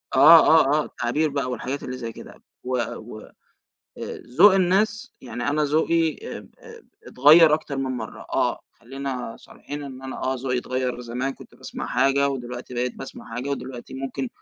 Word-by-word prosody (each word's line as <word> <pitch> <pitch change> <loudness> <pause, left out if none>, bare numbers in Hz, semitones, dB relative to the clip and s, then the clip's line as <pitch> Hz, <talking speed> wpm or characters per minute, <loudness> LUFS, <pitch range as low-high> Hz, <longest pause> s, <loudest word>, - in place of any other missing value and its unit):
آه، 160 +5 +8
آه، 155 -2 +5
آه، - - -5
التعبير 150 +6 -1
بقى 140 -3 -2
والحاجات 130 +3 -4
اللي 125 0 -5
زي 115 -2 -5
كده، - - -13 0.2
و 125 0 -1 0.2
و 110 0 -9
آآ - - -16 1.1
ذوق 195 +2 +8
الناس، 195 +4 +1
يعني 120 +1 -5
أنا 150 +1 +1
ذوقي 160 +1 +1
أ-أ - - -9 0.6
اتغيَّر 155 +4 +7
أكتر 155 -2 -4
من 130 -1 -2
مرة 110 -2 -7
آه، - - +1
خلّينا 130 -2 -6
صريحين 145 0 -9
إن 130 -1 -9
أنا 130 0 -6
آه 130 - 0
ذوقي 125 0 -2
اتغيَّر، 125 0 -3
زمان 125 +3 -3
كنت - - -15
باسْمَع - - -7
حاجة 140 +1 +2
ودلوقتي 125 -2 -6
بقيت 125 +1 -2
باسْمَع 115 - -9
حاجة، 125 +3 -4
ودلوقتي 130 -3 -6
ممكن 135 0 -4
135 Hz, 165 wpm, -24 LUFS, 125-150 Hz, 1.1 s, آه